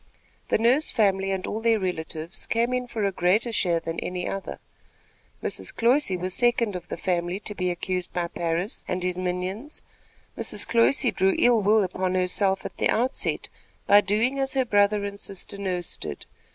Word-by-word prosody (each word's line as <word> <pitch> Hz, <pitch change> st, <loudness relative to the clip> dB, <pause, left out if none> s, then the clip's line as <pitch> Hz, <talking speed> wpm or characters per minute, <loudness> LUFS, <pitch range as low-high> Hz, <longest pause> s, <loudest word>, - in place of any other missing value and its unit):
The -, -, +2 dB
Nurse 245 Hz, +7 st, +3 dB
family 195 Hz, -3 st, +2 dB
and 190 Hz, -1 st, -2 dB
all 220 Hz, -, -3 dB
their 230 Hz, -1 st, +3 dB
relatives 170 Hz, -2 st, -4 dB
came 235 Hz, +2 st, +1 dB
in 250 Hz, 0 st, -1 dB
for 225 Hz, -3 st, -3 dB
a 200 Hz, -, +2 dB
greater 195 Hz, +6 st, +2 dB
share 175 Hz, -6 st, +1 dB
than 165 Hz, 0 st, -4 dB
any 180 Hz, 0 st, -3 dB
other. 195 Hz, -1 st, -4 dB, 0.9 s
Mrs. -, -, -3 dB
Cloyse 235 Hz, -4 st, +2 dB
was 185 Hz, +1 st, -3 dB
second 240 Hz, -3 st, +2 dB
of 180 Hz, -, -6 dB
the -, -, -5 dB
family 175 Hz, +1 st, -1 dB
to 210 Hz, -, -5 dB
be 185 Hz, -2 st, -1 dB
accused 180 Hz, 0 st, -2 dB
by 175 Hz, -1 st, -1 dB
Parris 170 Hz, +5 st, -2 dB
and 180 Hz, 0 st, -2 dB
his 180 Hz, 0 st, -1 dB
minions. 185 Hz, +9 st, -4 dB, 0.5 s
Mrs. -, -, -3 dB
Cloyse 240 Hz, +3 st, +3 dB
drew 190 Hz, +1 st, +2 dB
ill 240 Hz, -2 st, +4 dB
will 210 Hz, +1 st, +4 dB
upon 185 Hz, 0 st, -1 dB
herself 190 Hz, +1 st, +1 dB
at -, -, -7 dB
the -, -, +2 dB
outset 250 Hz, +4 st, 0 dB, 0.4 s
by 205 Hz, +1 st, +7 dB
doing 225 Hz, +7 st, +1 dB
as 270 Hz, 0 st, 0 dB
her 260 Hz, -1 st, +2 dB
brother 205 Hz, -2 st, +3 dB
and 200 Hz, 0 st, -6 dB
sister 200 Hz, 0 st, -7 dB
Nurse 180 Hz, -3 st, -1 dB
did. -, -, -6 dB
195 Hz, 180 wpm, -25 LUFS, 180-230 Hz, 0.9 s, by